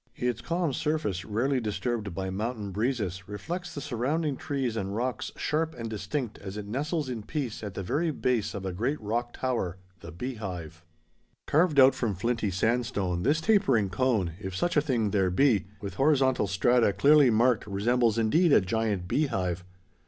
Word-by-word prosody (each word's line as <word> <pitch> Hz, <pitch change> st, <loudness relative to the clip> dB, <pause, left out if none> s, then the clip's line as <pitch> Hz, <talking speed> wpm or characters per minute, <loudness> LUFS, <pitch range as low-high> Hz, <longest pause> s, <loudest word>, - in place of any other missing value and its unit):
Its 125 Hz, -2 st, -2 dB
calm 170 Hz, -3 st, -1 dB
surface, 150 Hz, -, -1 dB
rarely 120 Hz, +7 st, 0 dB
disturbed 105 Hz, -2 st, -3 dB
by 95 Hz, 0 st, -3 dB
mountain 105 Hz, 0 st, -3 dB
breezes, 100 Hz, -4 st, -2 dB
reflects 175 Hz, -, -5 dB
the -, -, -3 dB
surrounding 145 Hz, +3 st, -1 dB
trees 130 Hz, -4 st, -2 dB
and 100 Hz, -2 st, -3 dB
rocks 125 Hz, +2 st, -2 dB
sharp 160 Hz, +2 st, -1 dB
and 115 Hz, -2 st, -5 dB
distinct 120 Hz, +2 st, -3 dB
as 100 Hz, +1 st, -7 dB
it 105 Hz, -, -5 dB
nestles 145 Hz, -, -2 dB
in 120 Hz, -4 st, -4 dB
peace 130 Hz, 0 st, -4 dB
at 105 Hz, -3 st, -6 dB
the 95 Hz, -, -3 dB
very 155 Hz, -, 0 dB
base 120 Hz, -8 st, 0 dB
of 95 Hz, -1 st, -5 dB
a 95 Hz, -, -3 dB
great 125 Hz, +11 st, -1 dB
rock 120 Hz, +3 st, -2 dB
tower—the 95 Hz, -9 st, -4 dB
Beehive. 90 Hz, -, -6 dB, 0.6 s
Carved 155 Hz, -1 st, +3 dB
out 130 Hz, 0 st, +8 dB
from 110 Hz, -5 st, -1 dB
flinty 115 Hz, +2 st, -1 dB
sandstone, 100 Hz, -3 st, 0 dB
this 150 Hz, -, +2 dB
tapering 135 Hz, -, +3 dB
cone, 105 Hz, -5 st, +1 dB
if 95 Hz, -2 st, -6 dB
such 175 Hz, -, 0 dB
a 150 Hz, -, +5 dB
thing 120 Hz, -8 st, 0 dB
there 95 Hz, -3 st, +2 dB
be, 105 Hz, 0 st, +3 dB
with 100 Hz, -3 st, -5 dB
horizontal 135 Hz, -2 st, +3 dB
strata 110 Hz, +4 st, +3 dB
clearly 140 Hz, -, +6 dB
marked 115 Hz, 0 st, +2 dB
resembles 115 Hz, +3 st, +1 dB
indeed 155 Hz, +10 st, +3 dB
a -, -, +7 dB
giant 100 Hz, -2 st, -1 dB
beehive. 95 Hz, -, 0 dB
115 Hz, 165 wpm, -28 LUFS, 100-135 Hz, 0.6 s, out